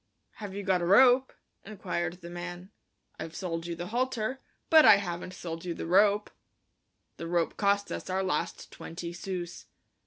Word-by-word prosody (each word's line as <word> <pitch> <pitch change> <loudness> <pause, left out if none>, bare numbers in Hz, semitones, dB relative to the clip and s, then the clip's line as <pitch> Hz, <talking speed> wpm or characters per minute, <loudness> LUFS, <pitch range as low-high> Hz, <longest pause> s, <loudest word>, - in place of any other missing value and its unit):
"Have 205 -3 -7
you 200 - -4
got 185 -2 +2
a - - 0
rope?" 255 +6 +6 0.3
inquired 180 -4 -4
the 170 - -9
man. 175 +2 -7 0.5
"I've 165 - -6
sold 165 -2 -4
you 170 - -3
the 175 +1 -6
halter, 255 +1 -1 0.3
but 315 -1 +9
I 210 - +9
haven't 180 -2 -4
sold 165 -2 -6
you 175 -2 -4
the - - -5
rope." 205 +4 +3 0.9
The 165 - -6
rope 170 -1 0
cost 200 0 +1
us - - -5
our 190 +1 0
last 180 -5 -3
twenty 170 +1 -7
sous. 175 -1 -6
185 Hz, 165 wpm, -29 LUFS, 175-205 Hz, 0.9 s, but